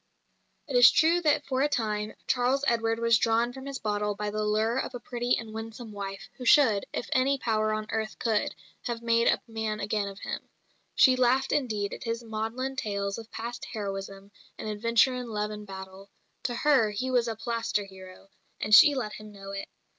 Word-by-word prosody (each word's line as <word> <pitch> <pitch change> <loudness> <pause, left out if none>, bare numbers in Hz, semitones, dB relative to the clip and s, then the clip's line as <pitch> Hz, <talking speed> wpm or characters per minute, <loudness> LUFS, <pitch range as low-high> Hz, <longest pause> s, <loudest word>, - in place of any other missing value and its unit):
It 275 - -4
is 245 0 +9
true 335 +2 +3
that 300 -2 +2
for 260 -1 -1
a 290 - +3
time 215 -4 -2
Charles 260 +3 +1
Edward 225 -1 +1
was 230 -1 +3
drawn 230 +1 +2
from 265 +1 -9
his 275 -1 -4
bottle 210 -2 -1
by 210 0 -3
the 215 0 -2
lure 215 +4 +1
of 265 - -4
a - - -5
pretty 245 0 -1
and 220 -1 -7
winsome 225 +1 -7
wife, 195 -1 -6
who 255 - -8
should, 245 -7 +5
if - - -4
any 270 +2 +2
power 215 -3 0
on 215 0 -2
earth 220 -1 -3
could, 220 -3 0 0.3
have 235 -1 -4
made 230 0 +3
a - - +3
man 220 -2 -3
again 205 0 -1
of 195 -1 -8
him. - - -5 0.5
She 260 -2 +6
laughed, 255 +1 +2
indeed, 215 -8 -1
at - - -8
his 230 +1 -3
maudlin 225 +4 -3
tales 200 -3 -2
of 225 0 -11
past 235 +2 -6
heroism 195 -1 -5 0.3
and - - -6
adventure 230 +4 +2
in 250 -1 -5
love 210 -1 -2
and 210 0 -8
battle; 190 0 -9 0.4
to 240 - -1
her 265 -5 +3
he 250 +6 -3
was 245 -2 +2
a 225 - -2
plaster 230 -2 -2
hero, 190 0 -13 0.3
and 215 - -1
she 290 +6 +9
let 215 -5 -3
him 215 0 -10
know 195 -1 -9
it. 195 0 -5
225 Hz, 200 wpm, -28 LUFS, 210-245 Hz, 0.5 s, is